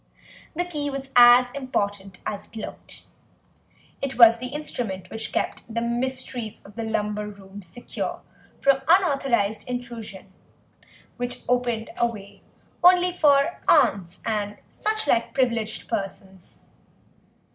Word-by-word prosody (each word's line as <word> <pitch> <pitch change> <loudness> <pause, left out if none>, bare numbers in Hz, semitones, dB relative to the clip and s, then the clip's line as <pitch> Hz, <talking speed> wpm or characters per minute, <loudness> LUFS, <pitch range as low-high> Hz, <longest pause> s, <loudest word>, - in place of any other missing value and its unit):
The 355 +2 0
key 300 -5 -3
was 270 -1 -6
as 245 +1 +8
important 200 -8 -3
as 205 -1 -4
it - - -20
looked; 220 - -7 1.0
it 265 -3 -3
was 230 -1 +8
the 250 - -4
instrument 235 -10 -4
which 225 0 -4
kept - - -3
the 230 - -1
mysteries 240 -1 -2
of 200 - -14
the 230 - -4
lumber 210 -1 -2
room 200 -1 -11
secure 190 +7 -6 0.4
from 275 -1 +3
unauthorised 275 - +2
intrusion, 230 -6 -6 0.8
which 245 0 -4
opened 245 -2 0
a 235 - +3
way 200 -3 -10 0.4
only 360 0 +6
for 285 0 +3
aunts 180 -3 +3
and 210 -2 -2
such 435 +1 -1
like 235 -4 +1
privileged 230 -5 0
persons. 195 -3 -6
235 Hz, 125 wpm, -24 LUFS, 210-265 Hz, 1.0 s, as